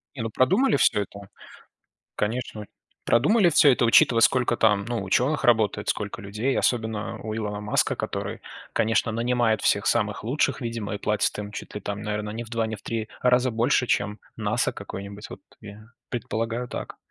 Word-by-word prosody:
Не, 120 Hz, -, -4 dB
ну 115 Hz, -, -2 dB
продумали 185 Hz, -, +3 dB
всё 105 Hz, -5 st, +3 dB
это, 100 Hz, 0 st, -9 dB, 0.9 s
конечно, 110 Hz, -1 st, -3 dB, 0.4 s
продумали 175 Hz, -, +4 dB
всё 150 Hz, -2 st, +6 dB
это, 125 Hz, -, +1 dB
учитывая, 115 Hz, 0 st, +5 dB
сколько 125 Hz, -1 st, +3 dB
там, 105 Hz, -3 st, +2 dB
ну, 115 Hz, -3 st, -3 dB
учёных 130 Hz, +10 st, +1 dB
работает, 110 Hz, -3 st, +2 dB
сколько 105 Hz, +2 st, -3 dB
людей, 105 Hz, +7 st, -2 dB
особенно 110 Hz, -3 st, -1 dB
у 110 Hz, 0 st, -4 dB
Илона 105 Hz, -2 st, -3 dB
Маска, 105 Hz, 0 st, 0 dB
который, -, -, -4 dB, 0.3 s
конечно, 115 Hz, +1 st, +1 dB
нанимает 120 Hz, -1 st, +1 dB
всех 100 Hz, -, +2 dB
самых 105 Hz, -4 st, 0 dB
лучших, 135 Hz, +3 st, 0 dB
видимо, 115 Hz, -3 st, -4 dB
и -, -, -4 dB
платит 105 Hz, 0 st, 0 dB
им, 105 Hz, 0 st, -6 dB
чуть 105 Hz, -, -8 dB
ли 105 Hz, -, -4 dB
там 100 Hz, +1 st, -4 dB
наверно, 105 Hz, 0 st, -3 dB
не 115 Hz, +3 st, -5 dB
в 115 Hz, -, -13 dB
2, 115 Hz, -1 st, -1 dB
не 110 Hz, 0 st, -4 dB
в -, -, -17 dB
3 115 Hz, -1 st, -4 dB
раза 125 Hz, 0 st, +3 dB
больше, 120 Hz, +2 st, +1 dB
чем 105 Hz, +1 st, 0 dB, 0.2 s
NASA 110 Hz, +2 st, 0 dB
какое-нибудь. 100 Hz, +1 st, -8 dB
Вот -, -, -10 dB, 0.2 s
я 105 Hz, +1 st, -11 dB, 0.3 s
предполагаю 115 Hz, 0 st, -3 dB
так. -, -, -6 dB
110 Hz, 175 wpm, -25 LUFS, 105-120 Hz, 0.9 s, всё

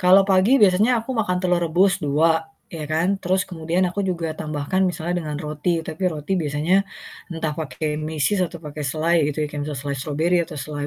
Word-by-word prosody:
kalau 190 Hz, +1 st, +7 dB
pagi 195 Hz, +7 st, +4 dB
biasanya 210 Hz, +6 st, +4 dB
aku 230 Hz, -, -8 dB
makan 205 Hz, -6 st, 0 dB
telur 180 Hz, -1 st, +2 dB
rebus 190 Hz, +4 st, +3 dB
2, 160 Hz, +3 st, +2 dB, 0.2 s
ya 160 Hz, -2 st, -5 dB
kan. 175 Hz, +5 st, +1 dB
Terus 185 Hz, +1 st, +1 dB
kemudian 170 Hz, +1 st, -1 dB
aku 200 Hz, -, -3 dB
juga 170 Hz, -4 st, -2 dB
tambahkan 155 Hz, +3 st, -2 dB
misalnya 175 Hz, 0 st, -2 dB
dengan 150 Hz, -1 st, -4 dB
roti, 155 Hz, +3 st, -1 dB
tapi 160 Hz, +4 st, -5 dB
roti 155 Hz, +2 st, -4 dB
biasanya 155 Hz, +6 st, +1 dB, 0.5 s
entah 160 Hz, -2 st, -2 dB
pake 155 Hz, -1 st, -3 dB
meses 155 Hz, +6 st, 0 dB
atau 170 Hz, 0 st, -9 dB
pake 150 Hz, 0 st, -7 dB
selai 155 Hz, +2 st, +1 dB
gitu 150 Hz, +1 st, -1 dB
ya, -, -, -4 dB
kan 145 Hz, -, -4 dB
bisa 150 Hz, -2 st, -4 dB
selai 140 Hz, +1 st, -3 dB
strawberry 155 Hz, +6 st, +1 dB
atau 155 Hz, -, -9 dB
selai, 145 Hz, +2 st, -4 dB
165 Hz, 195 wpm, -22 LUFS, 150-185 Hz, 0.5 s, kalau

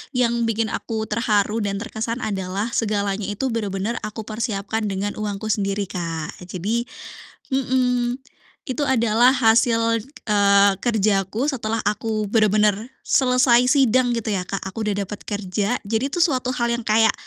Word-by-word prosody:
yang 235 Hz, -1 st, +2 dB
bikin 225 Hz, 0 st, 0 dB
aku 220 Hz, -2 st, -3 dB
terharu 215 Hz, -1 st, +1 dB
dan 200 Hz, -, -1 dB
terkesan 230 Hz, +2 st, -4 dB
adalah 195 Hz, +1 st, -2 dB
segalanya 205 Hz, -3 st, -1 dB
itu 210 Hz, +6 st, -2 dB
benar-benar 210 Hz, 0 st, -2 dB
aku 215 Hz, +1 st, -6 dB
persiapkan 215 Hz, -1 st, -3 dB
dengan 200 Hz, +1 st, -2 dB
uangku 210 Hz, +1 st, -3 dB
sendiri, 200 Hz, 0 st, -1 dB
Kak, 165 Hz, -3 st, -4 dB
jadi 210 Hz, +7 st, -2 dB, 0.7 s
mhm, 250 Hz, -2 st, +1 dB, 0.5 s
itu 275 Hz, +4 st, -2 dB
adalah 235 Hz, 0 st, +4 dB
hasil, 230 Hz, -1 st, +3 dB, 0.3 s
eee, 200 Hz, -1 st, +5 dB
kerja 210 Hz, -4 st, +2 dB
aku 235 Hz, +9 st, -2 dB
setelah 225 Hz, -4 st, -2 dB
aku 215 Hz, 0 st, -2 dB
benar-benar 215 Hz, +2 st, +2 dB
selesai 250 Hz, -2 st, +4 dB
sidang, 255 Hz, -2 st, +3 dB
gitu 230 Hz, -2 st, -3 dB
ya, 185 Hz, -3 st, -1 dB
Kak, 195 Hz, -, -3 dB
aku 210 Hz, +4 st, -4 dB
udah 200 Hz, -1 st, -1 dB
dapat 210 Hz, -, -7 dB
kerja, 205 Hz, +2 st, -1 dB
jadi 220 Hz, +4 st, -1 dB
itu 345 Hz, +5 st, -3 dB
suatu 255 Hz, -6 st, +1 dB
hal 235 Hz, 0 st, 0 dB
yang 235 Hz, -, -7 dB
kayak, 220 Hz, 0 st, +4 dB
220 Hz, 145 wpm, -22 LUFS, 205-235 Hz, 0.7 s, eee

